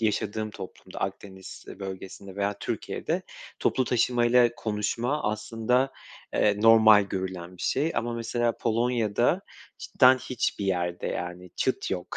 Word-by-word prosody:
yaşadığım 110 0 -1
toplumda 95 -2 -10
Akdeniz 95 -1 -6
bölgesinde 95 0 -8
veya 100 0 -1
Türkiye'de, - - -3 0.4
toplu 130 - +1
taşımayla 120 0 +3
konuşma 115 +6 -1
aslında, 115 +5 0 0.4
eee, 105 -1 +2
normal 110 -2 +7
görülen 95 -2 -5
bir - - -9
şey 150 +5 +1
ama 120 +1 -1
mesela 115 0 -1
Polonya'da 115 -2 +1 0.4
cidden 130 0 +4
hiçbir 120 -5 -2
yerde 90 -2 -1
yani 90 +1 -5
çıt - - -1
yok. 90 -1 -4
110 Hz, 120 wpm, -27 LUFS, 95-120 Hz, 0.4 s, normal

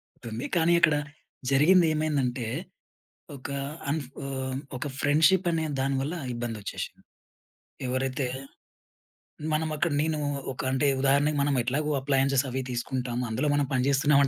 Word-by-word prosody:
ఉంటుంది. 115 +2 -8
కానీ 170 +1 +4
అక్కడ 155 -3 +5 0.5
జరిగింది 165 +6 +6
ఏమైందంటే, 135 -6 0 0.9
ఒక 130 - -8 0.4
అన్ 155 +2 +1 0.3
ఆహ్, 130 -1 -3 0.2
ఒక 130 - -4
ఫ్రెండ్‌షిప్ 160 +6 +4
అనే 160 -1 0
దాని 135 0 +1
వల్ల 155 +6 -2 0.2
ఇబ్బంది 120 -2 -3
వచ్చేసింది. - - -6 0.8
ఎవరైతే 130 +1 -1 1.3
మనం 155 +1 +1
అక్కడ 165 +2 +1
నేను 155 0 0 0.3
ఒక 130 - -5
అంటే 135 +2 +2
ఉదాహరణకి 140 +2 +3
మనం 140 0 +2
ఎట్లాగో 145 +5 -1
అప్లయెన్సెస్ 135 0 +2
అవి 130 +1 -2
తీసుకుంటాము. 125 0 -2
అందులో 130 +7 0
మనం 145 -1 +2
పనిచేస్తున్నామంటే 140 +2 +4
140 Hz, 125 wpm, -27 LUFS, 130-150 Hz, 1.3 s, జరిగింది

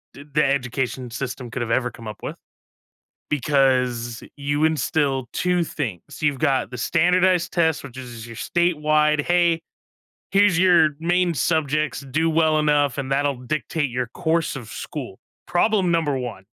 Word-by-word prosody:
s 140 - -11
the 150 0 +3
education 130 -2 -1
system 125 0 -5
could 130 - -4
have 120 - -3
ever 125 +1 +1
come 115 -2 -11
up 105 - -8
with - - -5 0.9
because 125 -5 +1
you 145 +1 0
instill 145 -4 0
2 180 -1 +1
things, 125 - -6
you've 145 -3 +1
got 135 -5 +1
the 125 - -6
standardized 180 +5 +2
test, 160 -3 +1
which 130 -2 -10
is 120 -3 -8
your 115 - -9
statewide, 155 -2 +2
"Hey! 170 0 +2 0.7
Here's 195 -3 +4
your 175 -4 +5
main 175 +1 +2
subjects, 155 +1 0
do 150 +5 0
well 160 -1 +3
enough, 145 -3 +2
and 135 -1 -3
that'll 140 -2 0
dictate 155 0 -1
your 125 +1 -2
course 160 +5 -1
of 120 -5 -8
school." - - -7 0.3
Problem 190 0 +2
number 165 -4 +1
1. 120 -6 -6
145 Hz, 150 wpm, -23 LUFS, 130-165 Hz, 0.9 s, your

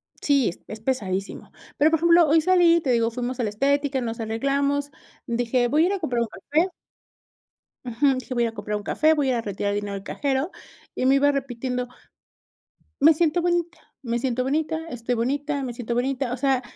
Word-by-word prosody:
Sí, 280 -7 +2 0.2
es 215 - -7
pesadísimo. 205 -5 -3 0.3
Pero, 305 +2 +4
por 325 - +2
ejemplo, 340 0 +5
hoy 320 +2 +4
salí, 340 -1 +4
te 275 - -3
digo, 230 -1 +2
fuimos 250 +1 -4
a 245 - +1
la 215 - 0
estética, 275 +4 0
nos 230 -1 -4
arreglamos, 280 +5 -1 0.4
dije: 240 +1 +1
"Voy 300 +6 +3
a - - +4
ir 400 - 0
a 395 - -2
comprar 245 -8 -1
un 235 - 0
café". 305 - -1 1.2
Ujú, 265 +3 +2
dije: 255 - -7
"Voy 240 -1 +1
a - - +2
ir - - -2
a - - -22
comprar 210 0 -3
un 210 - -8
café, 310 +8 +3
voy 290 -3 0
a 260 - +2
ir - - +1
a 235 - -1
retirar 200 -1 -3
dinero 205 0 -3
del 195 - -6
cajero", 275 - -2 0.4
y 255 - -1
me 270 - +5
iba 285 +1 +4
repitiendo: 250 -2 -3 1.1
"Me 315 +3 +7
siento 335 +2 +1
bonita, 345 0 0 0.2
me 235 -3 -2
siento 255 -1 -1
bonita, 320 +4 -1
estoy 245 -1 -3
bonita, 280 +4 -1
me 245 -2 -4
siento 235 0 -4
bonita". 255 0 -1
O - - -3
sea 265 -1 +1
265 Hz, 210 wpm, -24 LUFS, 235-295 Hz, 1.2 s, Me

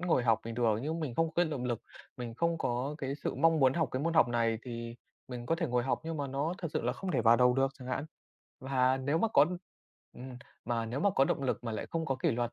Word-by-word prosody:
ngồi 170 -8 +2
học 115 -2 +3
bình 115 0 -5
thường 115 -3 +2
nhưng 160 +3 -2
mình 140 -7 -3
không 165 +2 +1
cái 175 +2 +3
động 145 -6 -3
lực, 120 -3 -2 0.3
mình 120 -3 -6
không 170 +5 0
có 125 +2 -1
cái 135 -2 -3
sự 145 - -4
mong 165 -1 +3
muốn 130 -1 +5
học 165 -5 +1
cái 130 - -1
môn 165 +1 0
học 160 -6 +5
này, 115 -1 +1
thì 115 -1 -6 0.3
mình 120 -2 -6
có 165 - +2
thể 165 -1 -1
ngồi 125 -2 +1
học 135 - 0
nhưng 165 0 -3
mà 145 -2 -2
nó 140 +5 -2
thật 170 - -3
sự - - -1
là 120 +1 0
không 190 +6 -5
thể - - +1
vào 115 +1 +6
đầu 125 0 +4
được 135 +1 +2
chẳng 130 -1 -9
hạn. 130 +2 -2 0.6
Và 130 -1 +2
nếu 140 +4 0
mà 225 - +2
có 145 -9 +5 0.7
ừm, 125 0 -9 0.3
mà 115 -1 -1
nếu 120 +5 -3
mà 200 - +3
có 135 -8 +3
động 140 - -1
lực 130 -2 -1
mà 115 - -3
lại 110 - -4
không 165 -1 -2
có 135 - 0
kỷ 130 - +1
luật 120 0 -1
130 Hz, 280 wpm, -31 LUFS, 120-160 Hz, 0.7 s, vào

